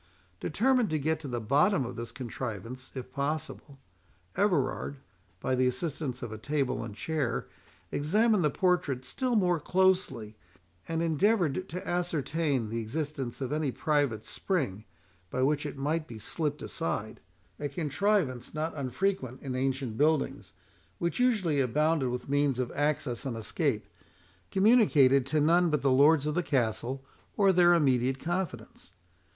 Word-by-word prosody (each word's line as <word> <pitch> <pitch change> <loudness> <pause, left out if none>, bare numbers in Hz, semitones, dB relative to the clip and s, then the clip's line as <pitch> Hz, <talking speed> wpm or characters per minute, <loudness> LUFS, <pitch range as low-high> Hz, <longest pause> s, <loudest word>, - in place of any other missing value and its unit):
Determined 245 +4 +2
to 155 - 0
get 155 +2 0
to 155 - -7
the 120 -2 -2
bottom 140 - +3
of 120 - -6
this 115 0 -6
contrivance 120 0 -6
if 130 -1 -7
possible, 145 0 -4 0.6
Everard, 145 -7 0 0.4
by 130 - -1
the 130 0 +3
assistance 130 -1 -3
of 120 - -5
a 110 - -7
table 140 0 -1
and 110 -3 -7
chair, 155 +3 -2 0.5
examined 210 +7 +2
the 150 - +3
portrait 145 -7 0
still 250 - -1
more 180 -5 +3
closely, 180 - +1 0.5
and 165 0 -1
endeavoured 175 +1 +1
to 180 +2 -6
ascertain 160 -7 -1
the 115 +1 -2
existence 135 +2 -4
of 130 - -2
any 150 -1 0
private 140 -7 0
spring, 130 - -2 0.4
by 130 - -1
which 145 +2 +1
it 140 - -7
might 155 +3 -1
be 115 - -8
slipt 150 +7 -3
aside,—a 145 - -5
contrivance 150 - 0
not 155 +1 -2
unfrequent 135 -1 -2
in 135 -2 -4
ancient 130 -3 -1
buildings, 140 - +1 0.4
which 170 +3 -2
usually 210 - +2
abounded 145 +2 +2
with 125 0 -4
means 140 -2 +2
of 125 -1 -2
access 145 -4 0
and 130 -5 -3
escape, 115 - -1 0.6
communicated 170 - +5
to 155 +2 +1
none 170 +4 +4
but 150 -4 0
the 135 - +3
lords 145 +3 +5
of 150 - 0
the 175 - +1
castle, 130 -2 -1 0.3
or 195 -2 +5
their 175 -1 +6
immediate 130 -4 +2
confidants. 160 - -4
145 Hz, 145 wpm, -29 LUFS, 130-170 Hz, 0.6 s, their